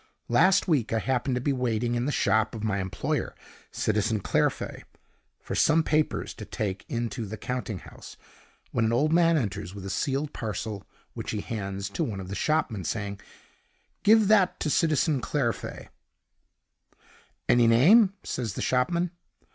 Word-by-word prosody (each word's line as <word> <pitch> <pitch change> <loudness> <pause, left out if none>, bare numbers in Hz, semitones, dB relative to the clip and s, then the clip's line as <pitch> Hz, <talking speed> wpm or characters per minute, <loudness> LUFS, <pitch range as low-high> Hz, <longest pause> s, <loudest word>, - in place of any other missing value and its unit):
Last 185 +13 +4
week 145 - +1
I 115 - +1
happened 130 +2 0
to 125 - -1
be 140 +2 +1
waiting 120 -2 0
in 120 +1 0
the - - 0
shop 110 -2 +1
of 110 - -6
my 105 -2 0
employer, 95 -1 -2 0.3
Citizen 110 0 0
Clairfait, - - -1 0.6
for - - -7
some 160 +1 +4
papers 155 0 0
to 110 - -9
take 100 -2 -4
into 115 -1 -3
the 110 +3 -6
counting 125 -2 -4
house, - - -12 0.5
when - - +1
an 110 +1 +1
old 150 +6 +2
man 170 -1 +4
enters 100 -6 -3
with 100 -1 -8
a 95 - -4
sealed 140 +4 -1
parcel, 105 -2 -4 0.3
which - - -6
he 105 - -2
hands 100 -3 -4
to - - -1
one 100 -4 -3
of 95 -1 -7
the - - -4
shopmen, 120 - 0
saying: 100 +3 -3 0.8
"'Give 220 0 +5
that 200 -3 +4
to 150 - 0
Citizen 155 -4 +2
Clairfait.' 120 -5 -3 1.6
"'Any 120 -1 +5
name?' 190 - +6
says 115 -6 -3
the - - -4
shopman. 170 +7 +1
120 Hz, 160 wpm, -27 LUFS, 105-150 Hz, 1.6 s, name